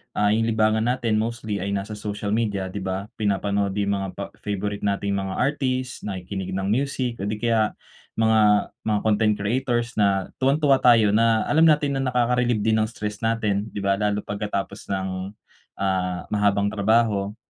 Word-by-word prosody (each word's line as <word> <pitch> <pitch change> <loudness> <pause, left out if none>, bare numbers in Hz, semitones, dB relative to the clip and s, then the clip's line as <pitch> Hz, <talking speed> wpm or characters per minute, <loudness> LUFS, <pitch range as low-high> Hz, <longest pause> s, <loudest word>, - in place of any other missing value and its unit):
ah, 105 0 +3
yung 115 +1 +2
libangan 110 -1 +2
natin 120 -4 +1
mostly 110 -2 -3
ay 100 +2 -2
nasa 100 +2 -4
social 105 -1 -4
media, 100 -4 -1
'di 100 - -5
ba? 95 +3 -4
Pinapanood 100 -1 0
yung 100 -1 0
mga 100 -1 -1
pa 100 - -4 0.2
favourite 105 0 -3
nating 100 0 -1
mga 95 -1 -4
artist, 130 -2 -1
nakikinig 95 0 -5
ng 95 - -2
music, 130 -1 -1
o 100 - -3
di 105 - -1
kaya, 110 -1 +1 0.4
mga 110 -2 +3 0.2
mga 105 -1 +2
content 110 0 +3
creators 120 +3 0
na 100 -2 +1
tuwang-tuwa 140 0 +3
tayo 115 -4 +5
na 110 +1 +3
alam 160 +2 +4
natin 145 -3 +2
na 135 - -1
nakaka-relieve 120 -2 +1
din 110 0 +2
ng 110 - +1
stress 105 -2 -5
natin, 110 -2 0
'di 100 -2 -6
ba, 100 0 +1
lalo 105 -1 0
pagkatapos 100 -1 -4
ng, 95 -1 -2 0.7
ah, 95 -2 -1
mahabang 100 -1 +2
trabaho. 105 -1 +1
105 Hz, 170 wpm, -24 LUFS, 100-115 Hz, 0.7 s, tayo